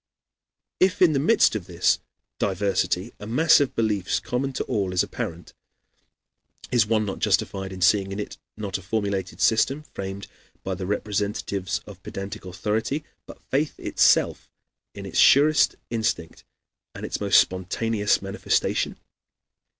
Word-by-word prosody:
If 185 0 +3
in 175 -4 +5
the 140 - +2
midst 160 - +4
of 95 -5 -4
this 90 -1 +2 0.4
diversity 95 +1 0
a 105 - -8
mass 155 +9 +5
of 140 -2 0
beliefs 105 -5 0
common 135 +2 -2
to - - -2
all 95 -3 -1
is 90 - +3
apparent, 85 +1 -6 1.2
is 115 -4 +3
one 110 -1 +1
not 100 - -4
justified 95 -1 0
in 95 -1 -8
seeing 95 +1 +3
in 100 - -4
it, 105 - -6 0.2
not 100 -3 -3
a - - -12
formulated 95 -3 -2
system, 135 +9 +2
framed 95 0 -5 0.4
by 95 - -2
the 95 0 -5
representatives 100 -2 -2
of - - -12
pedantic 100 +1 -7
authority, 110 - -2 0.2
but - - -14
faith 145 +3 0
itself - - +2 0.5
in - - -7
its - - -2
surest 150 +2 +5 0.2
instinct 110 -8 -2 0.5
and - - -6
its - - -4
most 100 -1 +6
spontaneous 105 +3 0
manifestation? - - -1
105 Hz, 140 wpm, -24 LUFS, 95-115 Hz, 1.2 s, most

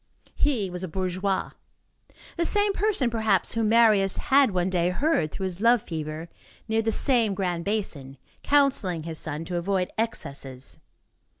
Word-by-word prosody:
He 250 -9 0
was 180 0 -6
a - - -3
bourgeois. 185 +2 -2 0.8
The 340 - 0
same 410 +2 +3
person, 390 - +1
perhaps, 220 -1 +1
whom 225 -2 0
Marius 215 -4 +4
had 275 -1 +4
one 185 -1 -1
day 175 -1 +1
heard, 180 - 0
through 195 - -6
his 185 0 -3
love 235 -1 +4
fever, 155 0 -5 0.4
near 220 0 +1
the 225 0 0
same 230 -6 +3
grand 175 -3 -2
basin, 150 -11 -3 0.2
counselling 260 - +2
his 160 -1 -5
son 155 +1 -5
"to 175 +1 -3
avoid 185 +1 -1
excesses." 140 - -5
195 Hz, 155 wpm, -25 LUFS, 170-230 Hz, 0.8 s, Marius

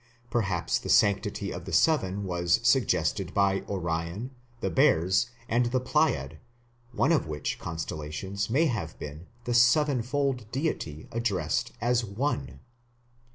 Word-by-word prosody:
Perhaps 95 -7 0
the - - -7
sanctity 100 -1 +2
of - - -7
Seven 100 - +2
was 85 -2 +1
suggested 95 - +1
by 100 -1 +3
Orion, 85 +5 -3 0.3
the - - -2
Bears, 95 - +3 0.2
and 120 +1 +2
the 130 +2 +1
Pleiad, 150 +5 0 0.5
one 140 - +2
of 155 - +2
which 75 -1 -3
constellations 80 +5 -4
may 145 +8 +3
have 105 - -2
been 75 +4 -8 0.2
the 120 - -2
"Sevenfold" 125 -1 +2
deity 120 - -3
addressed 105 -9 -1
as 120 +1 +2
"one". 100 - -3
100 Hz, 120 wpm, -28 LUFS, 85-125 Hz, 0.5 s, by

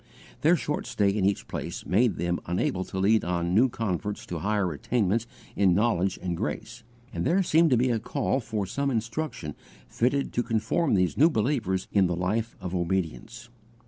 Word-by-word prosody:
Their 165 +4 +5
short 150 -2 -3
stay 100 -1 +1
in 100 -1 0
each 100 0 0
place - - -5
made 100 +4 +2
them 85 +1 -1
unable 90 +1 0
to 95 - -7
lead 105 +4 +3
on 85 0 -1
new 120 +7 +5
converts 105 -2 -3
to 85 - -5
higher 100 -1 0
attainments 110 - 0 0.3
in 95 -3 +4
knowledge 100 -3 +1
and 90 -2 -1
grace, - - -5 0.3
and - - -2
there 190 +4 +2
seemed 165 -1 +4
to 125 - +4
be 125 +2 +2
a 115 - +1
call 135 +3 -1
for 110 -4 -3
some 140 +8 -1
instruction 115 - -3 0.3
fitted 135 +4 0
to 120 - +1
confirm 115 +6 +1
these 90 -4 +1
new 160 +4 +7
believers 110 - 0
in 100 -3 +4
the 90 - -1
life 105 +6 -1
of 90 - -5
obedience. 95 +7 -3
105 Hz, 180 wpm, -27 LUFS, 90-120 Hz, 0.3 s, new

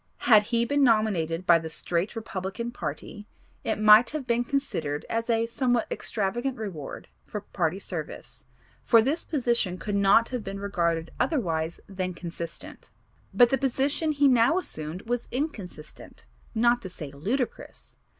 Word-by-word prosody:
Had 215 -4 +6
he 235 +1 +1
been 285 +3 +2
nominated 190 -8 +2
by 170 -1 +6
the 160 0 -6
straight 170 +6 -1
Republican 220 +1 -4
party 175 +3 -6 0.4
it 220 - -1
might 215 +2 +7
have 300 -3 -4
been 235 0 +1
considered 165 - -2
as 230 +1 -2
a 230 0 +2
somewhat 245 0 0
extravagant 240 +5 -2
reward 180 -10 -7 0.2
for 210 - -5
party 175 -3 -2
service 195 - -6 0.4
for 230 - +6
this 295 +7 0
position 235 - 0
could 205 +2 -5
not 200 +3 +4
have 250 -4 -4
been 195 0 -6
regarded 170 -5 -1
otherwise 165 - -1
than 185 -2 -4
consistent; 170 -1 -8 0.4
but 245 -1 +5
the 270 - +2
position 275 +4 +1
he 285 -1 +3
now 250 +5 +4
assumed 160 - -4
was 240 +1 -2
inconsistent, 195 - -6 0.3
not 240 +2 +3
to 185 - -6
say 150 -5 -7
ludicrous. 225 - -4
215 Hz, 150 wpm, -27 LUFS, 175-245 Hz, 0.4 s, might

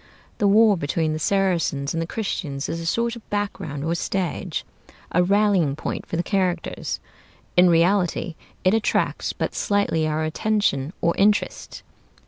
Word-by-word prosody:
The 205 - +3
war 210 0 +5
between 155 +1 -1
the 155 - -3
Saracens 170 -6 +1
and 165 - -1
the 165 - -3
Christians 155 -10 -3
is 165 - -3
a 165 - -5
sort 235 +5 0
of 235 - -13
background 195 -8 -3
or 165 +2 0
stage; 180 0 -2 0.5
a 180 - +3
rallying 195 -6 +3
point - - -5
for 165 - -3
the 175 - 0
characters. 185 -4 -1 0.6
In 180 0 +6
reality 175 +1 +2 0.3
it 185 - +4
attracts 225 -1 0
but - - -3
slightly 200 -6 +1
our 155 0 -1
attention 155 -4 0
or 170 - +2
interest. 205 +1 +1
180 Hz, 150 wpm, -23 LUFS, 160-205 Hz, 0.6 s, In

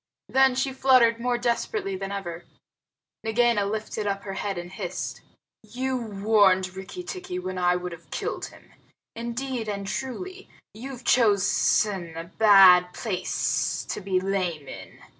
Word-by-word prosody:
Then 265 -1 +4
she 265 +1 -1
fluttered 255 -3 +4
more 245 0 0
desperately 235 -5 -1
than 195 +1 -5
ever. 175 -4 -6 0.8
Nagaina 225 -2 +2
lifted 215 0 -3
up 200 0 -2
her 195 - -5
head 195 0 -3
and 175 0 -6
hissed, - - -5 0.4
"You 255 +5 -3
warned 200 -5 +2
Rikki 190 - -7
tikki 365 0 -6
when 185 - -4
I 180 0 +3
would 180 0 -4
have 170 0 -12
killed - - -3
him. - - -18 0.4
Indeed 235 0 -4
and 200 -1 -4
truly, 365 - -5 0.2
you've 255 +2 -8
chosen 200 -6 +2
a 165 - -4
bad 185 -1 +6
place 200 -6 -1
to - - -3
be 185 -1 0
lame 185 -6 -2
in." - - -10
205 Hz, 140 wpm, -25 LUFS, 185-245 Hz, 0.8 s, bad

